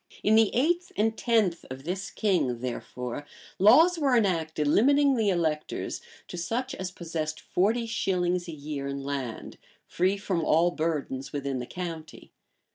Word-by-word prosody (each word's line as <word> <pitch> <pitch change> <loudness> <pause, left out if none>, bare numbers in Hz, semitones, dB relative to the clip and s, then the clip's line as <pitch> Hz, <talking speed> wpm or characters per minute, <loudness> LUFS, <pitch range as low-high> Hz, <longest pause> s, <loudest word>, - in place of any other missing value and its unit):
In 215 - +4
the 220 -2 +6
eighth 345 +8 +1
and 220 +2 +2
tenth 220 -7 +1
of 130 +1 -8
this 190 +5 -3
king, 155 - 0
therefore, 125 +1 -5 0.4
laws 325 - +6
were 270 -5 +3
enacted, 160 -7 0
limiting 280 - +4
the 220 -4 +2
electors 160 -4 -1 0.3
to - - -7
such 250 +9 -2
as 190 -7 -4
possessed 160 -3 -4
forty 220 +6 +1
shillings 180 -5 0
a - - -5
year 145 -2 -5
in 140 0 -4
land, 135 -5 -5 0.3
free 185 +3 +1
from 190 -4 -1
all 165 +3 +3
burdens 145 -5 -3
within 140 -2 -3
the 125 - -5
county. 165 -3 -7
175 Hz, 150 wpm, -27 LUFS, 150-220 Hz, 0.4 s, the